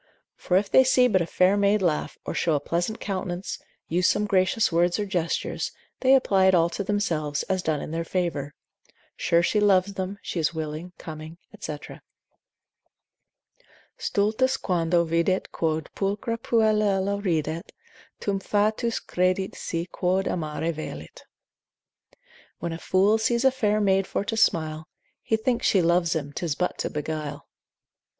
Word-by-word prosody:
For 180 - +1
if 200 +1 +1
they 260 - +7
see 255 -1 +4
but 190 -6 +2
a 170 - -1
fair 185 +3 +3
maid 205 +1 +3
laugh, 160 -4 0
or - - -3
show 165 -3 +1
a - - +1
pleasant 175 +9 -2
countenance, 185 -2 -4 0.3
use 180 +2 +2
some 210 - +2
gracious 195 +2 +2
words 175 +1 +2
or 210 - -1
gestures, 175 -4 -2 0.3
they 265 +1 +5
apply 195 -7 +3
it 190 - +5
all 170 0 +3
to 200 - -3
themselves, 160 -8 -1
as 185 -1 -1
done 155 -4 -1
in - - -6
their 165 +1 -2
favour; 165 -5 -2 0.6
sure 170 0 +2
she 210 - +2
loves 200 -1 +3
them, 195 +1 -4
she 175 - -3
is 160 +1 0
willing, 160 +2 -5
coming, 155 +1 -9 0.2
&c. 150 - -4 2.2
Stultus 225 +6 +1
quando 170 -2 +1
videt 170 +3 0
quod 160 -1 -1
pulchra 205 +4 -2
puellula 210 -3 +1
ridet, 160 -3 -1 0.5
Tum 200 -1 -1
fatuus 215 +4 0
credit 185 +1 0
se 170 0 -3
quod 185 +2 0
amare 160 0 -2
velit: 80 - -8 1.3
When 170 -1 -4
a 165 - -6
fool 200 +5 +3
sees 235 +3 +1
a 265 - +6
fair 215 -5 +1
maid 195 -2 +2
for 200 - -2
to 225 - -2
smile, 155 -7 +1 0.3
He 220 - 0
thinks 235 +2 0
she 190 -4 +3
loves 170 0 +2
him, 145 -2 -3
'tis 160 -3 -2
but 180 - -2
to - - -1
beguile. 150 -1 -4
185 Hz, 155 wpm, -25 LUFS, 165-205 Hz, 2.2 s, they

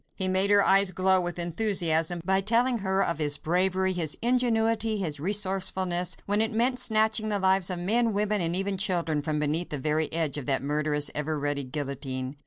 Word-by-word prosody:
He 190 - 0
made 190 +2 +3
her 205 -1 +4
eyes 195 0 +5
glow 185 +1 +2
with 175 0 -4
enthusiasm 170 -2 0
by 190 +1 +1
telling 235 +4 +1
her 195 0 0
of 170 -2 -2
his 145 -2 0
bravery, 185 +2 0
his 165 -4 -1
ingenuity, 225 -2 +1
his 160 -7 -3
resourcefulness, 185 -1 0
when 205 +2 0
it 225 +1 -1
meant 245 +3 0
snatching 220 -1 +2
the 205 - 0
lives 190 -1 +1
of 180 - -3
men, 225 +6 0
women, 210 0 -1
and 170 0 -1
even 195 +1 -2
children 170 -6 0
from 150 0 -3
beneath 150 +4 -1
the 150 - -4
very 155 +3 -1
edge 160 -3 -1
of 140 - -10
that 135 -2 -1
murderous, 150 0 -1
ever 150 +1 -2
ready 145 -1 -2
guillotine. 135 -1 -6
185 Hz, 195 wpm, -26 LUFS, 155-205 Hz, -, eyes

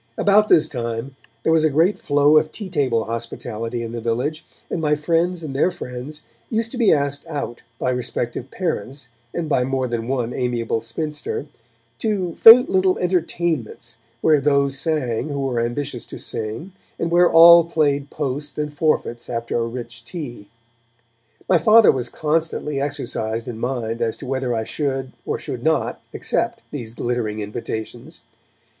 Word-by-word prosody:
About 210 +1 +4
this 155 -5 +5
time 120 -1 -4 0.3
there 160 - +3
was 160 -1 +4
a 155 - +4
great 165 +8 +2
flow 145 +1 +4
of 155 0 +2
tea 205 -4 -7
table 130 -10 +1
hospitality 115 0 -4
in 115 - -5
the 120 0 -5
village, 125 +8 -2 0.2
and 165 - -3
my 150 -1 +2
friends 165 +3 0
and 140 -4 -6
their 145 - +3
friends 145 -2 -8 0.3
used 225 0 -1
to 255 - -6
be 230 - +5
asked 145 -1 +1
out, 145 -6 -5 0.2
by 125 - 0
respective 125 0 -3
parents 140 -7 -4 0.2
and 170 -2 -3
by 130 -4 +2
more 130 0 -1
than 115 -1 -3
one 125 -2 -1
amiable 120 -3 -1
spinster, 150 +6 -4 0.5
to 195 -6 -1
faint 230 +7 +9
little 185 0 +2
entertainments 170 - -2 0.2
where 155 -3 +4
those 140 -1 +2
sang 145 -7 -1
who 140 -1 -3
were 130 -3 -1
ambitious 120 +1 -3
to - - -8
sing, 115 - -5 0.3
and 165 - -2
where 175 +1 +5
all 170 +1 +9
played 145 -4 0
post 145 0 -4
and 150 -1 -3
forfeits 145 -6 0
after 115 -1 -3
a 115 -1 0
rich 115 -1 -7
tea. 120 - -7 1.0
My 180 - +4
Father 215 +7 +7
was 125 -2 -3
constantly 150 -2 -1
exercised 120 -5 -2
in 115 -2 -6
mind 120 -2 -3
as 115 -1 -1
to - - -9
whether 130 -2 -1
I 110 - -1
should 135 0 -3 0.2
or - - -1
should - - -6
not - - 0
accept - - -2
these 120 -5 -6
glittering 120 -4 -2
invitations. 115 +6 -6
140 Hz, 165 wpm, -21 LUFS, 120-160 Hz, 1.0 s, faint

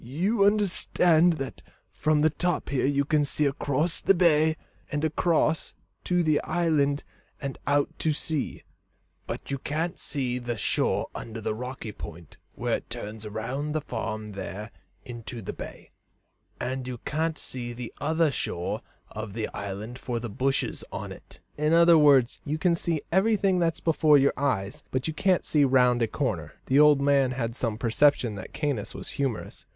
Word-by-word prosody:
"You 190 - +1
understand 180 -4 +4
that 135 -4 -6 0.3
from 155 -1 +1
the 155 +1 +4
top 175 +2 -1
here 135 -2 +1
you 140 0 +1
can 150 0 +2
see 145 +1 +1
across 145 +4 0
the 195 - +4
bay, 160 -2 +4 0.3
and 145 +2 0
across 160 0 +1 0.3
to 180 -1 +2
the 155 -2 +2
island 150 -5 +1 0.4
and 140 -1 -5
out 145 0 +1
to 160 - +1
sea; 150 -1 -2 0.6
but - - -5
you 140 - -2
can't 165 +6 -2
see 125 -4 -1
the 120 -1 -4
shore - - +1
under 115 0 -7
the 110 - -2
rocky 125 -1 -6
point 85 -3 -10 0.2
where - - 0
it - - -15
turns 105 +1 -6
round 130 +8 -3
the - - +2
farm 110 -5 -4
there 100 +2 -6 0.3
into 120 -1 -7
the 100 - -5
bay, - - -9 0.7
and 130 +1 -3
you 125 -1 -4
can't 160 +1 -1
see 120 -3 -4
the 120 0 -7
other 160 +1 +2
shore 90 -9 -3 0.3
of 110 -2 -6
the 110 0 -3
island 105 +5 -6
for 120 -3 -3
the 115 -2 -6
bushes 135 +6 -1
on - - -5
it." - - -13 0.2
"In 150 +1 +2
other 170 0 +7
words, 140 -5 +5
you 155 +1 -2
can 175 +2 +2
see 165 -2 -1
everything 195 0 +3
that's 165 -2 +1
before 155 -2 +4
your 140 0 +3
eyes, 115 -9 -1
but 130 +2 -1
you 160 - -2
can't 185 +3 +2
see 150 -2 +3
round 125 -2 +4
a 115 - +3
corner." - - -2
The 135 +2 +3
old 150 -2 +6
man 140 -2 +3
had 115 -3 -3
some 115 -4 -2
perception 120 0 +3
that 100 -2 -8
Caius 135 -9 -2
was - - -7
humorous. 135 -6 -4
140 Hz, 170 wpm, -27 LUFS, 120-160 Hz, 0.7 s, other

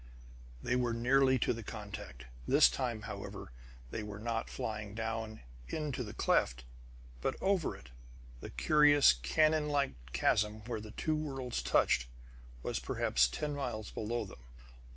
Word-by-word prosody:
They 125 - +1
were 120 -2 +1
nearly 130 +2 +4
to 125 - +1
the 115 - -6
contact. 100 - -8 0.2
This - - +6
time, 120 -5 -2
however, 85 - -7 0.4
they - - -3
were 105 -1 -6
not 115 +1 -2
flying 105 -4 -4
down 110 -1 -3 0.3
into 145 -5 -3
the 105 - -8
cleft, 60 +1 +2 0.6
but - - 0
over 190 -5 +1
it. - - -15 0.5
The - - -8
curious, 145 - +5
canonlike 150 - +2 0.2
chasm 105 +10 +1
where 115 -2 -3
the 110 - -9
two 155 +8 -1
worlds 135 -5 -3
touched 60 - +3 0.6
was - - -1
perhaps 60 0 +2
ten 150 - -3
miles 120 -7 -4
below 115 +1 -2
them. 95 - -12
115 Hz, 140 wpm, -33 LUFS, 105-135 Hz, 0.6 s, This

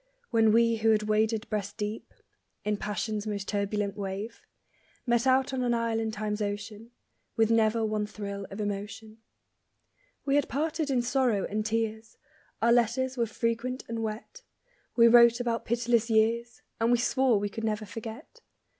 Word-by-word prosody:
When 225 -2 +4
we 230 +1 +4
who 225 0 +2
had 215 -1 +3
waded 215 +1 +1
breast 205 -1 -4
deep 210 +1 -5 0.5
In 210 0 0
passion's 210 +1 -3
most 200 -2 -3
turbulent 205 0 -1
wave 200 +3 -5 0.6
Met 240 +1 +2
out 265 +1 +3
on 260 - -1
an 240 -1 +1
isle 230 -1 0
in 225 0 -1
Time's 215 -1 -3
ocean, 210 +2 -5 0.5
With 225 0 +3
never 225 0 +3
one 215 -1 -1
thrill 200 -2 -6
of 195 - -8
emotion. 210 +2 -5 1.1
We 280 0 +3
had 290 - 0
parted 310 +3 -1
in 250 -3 +1
sorrow 245 -5 +1
and 215 +1 -2
tears; 220 0 -3 0.5
Our 235 - +5
letters 245 +2 +1
were 235 -2 0
frequent 230 +3 -2
and 230 0 -4
wet; 220 - -6 0.5
We 235 -1 +7
wrote 235 0 +7
about 235 -1 -2
pitiless 235 0 +1
years, 230 +2 +1 0.2
And 230 +1 +2
we 245 - +5
swore 250 -1 +2
we 205 0 -2
could 225 +2 -6
never 215 -1 -1
forget. 225 - -9
225 Hz, 165 wpm, -28 LUFS, 210-235 Hz, 1.1 s, We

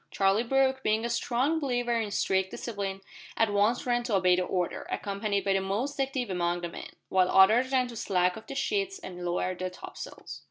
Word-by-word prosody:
Charlie 195 +2 +2
Brooke, 265 +2 +2
being 220 -1 +1
a 235 - -2
strong 255 +6 +1
believer 245 -4 0
in 225 -3 0
strict 190 -1 +1
discipline, 195 -4 -4 0.4
at 225 -2 +2
once 210 +4 +2
ran 240 -1 +1
to 230 -4 0
obey 185 -1 +4
the 180 - 0
order, 180 -1 -2
accompanied 200 0 -2
by 195 - +3
the 195 - +1
most 220 +10 -2
active 265 -5 -2
among 175 -1 0
the 175 - -3
men, - - -8 0.2
while 185 -1 +3
others 220 +8 +5
ran 255 -2 +2
to 240 - -9
slack 180 -4 +1
off 220 - -11
the 275 - -6
sheets 390 +5 -1
and 180 - -8
lower 175 +1 -1
the 185 0 -4
topsails. 180 - -9
210 Hz, 205 wpm, -28 LUFS, 190-245 Hz, 0.4 s, others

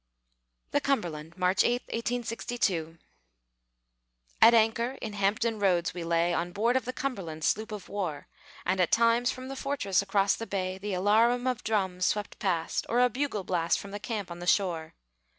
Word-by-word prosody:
THE 290 - +2
CUMBERLAND 170 - -2
[March 185 +1 +3
8, 245 +1 +1
1862] 230 -8 -2 1.4
At 235 - +8
anchor 230 +2 +2
in 220 -2 -5
Hampton 210 +3 0
Roads 180 -4 +2
we 175 - -5
lay, 170 +1 +1
On 175 +1 -1
board 230 +6 +1
of 260 - +1
the 255 - -2
Cumberland, 190 -13 -4
sloop 215 +7 0
of 210 -3 -7
war; 180 -8 -4 0.4
And 185 +1 +1
at 180 - +2
times 235 +1 +4
from 255 0 -5
the 270 - -6
fortress 260 -10 0
across 195 0 +2
the 225 - -6
bay 185 -1 -3
The 200 -1 -3
alarum 225 +6 +3
of 255 -2 -1
drums 190 -4 0
swept 210 -1 -2
past, 170 -4 -1
Or 235 - +2
a 250 0 +5
bugle 255 -5 -2
blast 170 -2 +1
From 200 - -8
the 205 - -5
camp 210 -4 -4
on 170 - -7
the 175 - -7
shore. 170 -5 +1
205 Hz, 175 wpm, -29 LUFS, 180-235 Hz, 1.4 s, At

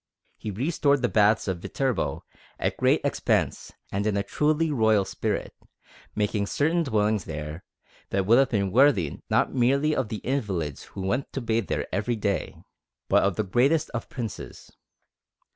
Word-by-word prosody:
He - - -6
restored 140 - +1
the 120 - +2
baths 105 0 +3
of 95 -3 -2
Viterbo 130 +7 -2 0.3
at - - -1
great - - +3
expense - - 0 0.2
and 100 +2 -1
in 105 -2 +1
a 100 - 0
truly 155 +8 +1
royal 110 -6 +3
spirit, - - -3 0.6
making 105 -1 0
certain 160 +8 +1
dwellings 110 - +1
there 75 +1 -6 0.5
that 95 -1 0
would 115 +5 +6
have 135 - +3
been 100 -4 0
worthy 115 - +3
not - - +2
merely 140 +5 +2
of 130 -5 -1
the 110 - -3
invalids 95 - -2
who 100 - -8
went 125 +8 -1
to - - -2
bathe 115 -2 0
there - - -1
every 105 +5 0
day, 100 -3 -2 0.5
but - - +5
of 100 -2 +1
the 110 - 0
greatest 135 - +2
of 120 - -5
Princes. 115 -5 -7
110 Hz, 160 wpm, -26 LUFS, 100-135 Hz, 0.6 s, would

